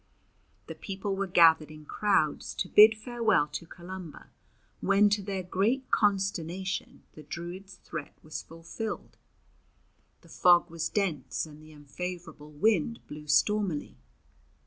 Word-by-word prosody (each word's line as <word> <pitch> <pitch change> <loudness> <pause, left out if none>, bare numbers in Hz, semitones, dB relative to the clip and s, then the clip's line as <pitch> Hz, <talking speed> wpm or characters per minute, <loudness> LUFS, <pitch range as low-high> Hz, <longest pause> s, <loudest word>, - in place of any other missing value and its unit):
The - - -7
people 195 0 -4
were 195 0 -2
gathered 165 -4 +5
in 155 0 -12
crowds 195 -5 0
to - - -2
bid 215 +3 +7
farewell 220 - +1
to 150 +3 -6
Columba, 175 -2 -10 0.5
when 200 +1 +4
to 205 0 +2
their 195 -1 -4
great 215 +9 0
consternation 190 -2 -1
the 155 - -11
Druid's 175 +5 -8
threat 160 -4 -8
was 155 - -6
fulfilled. 165 +7 -7 1.1
The - - -19
fog 175 -1 +4
was 165 -1 -2
dense 160 - -1
and 155 -1 -13
the 155 0 -15
unfavourable 155 +1 -7
wind 210 +6 +1
blew 150 0 -10
stormily. 160 - +1
180 Hz, 125 wpm, -29 LUFS, 155-200 Hz, 1.1 s, bid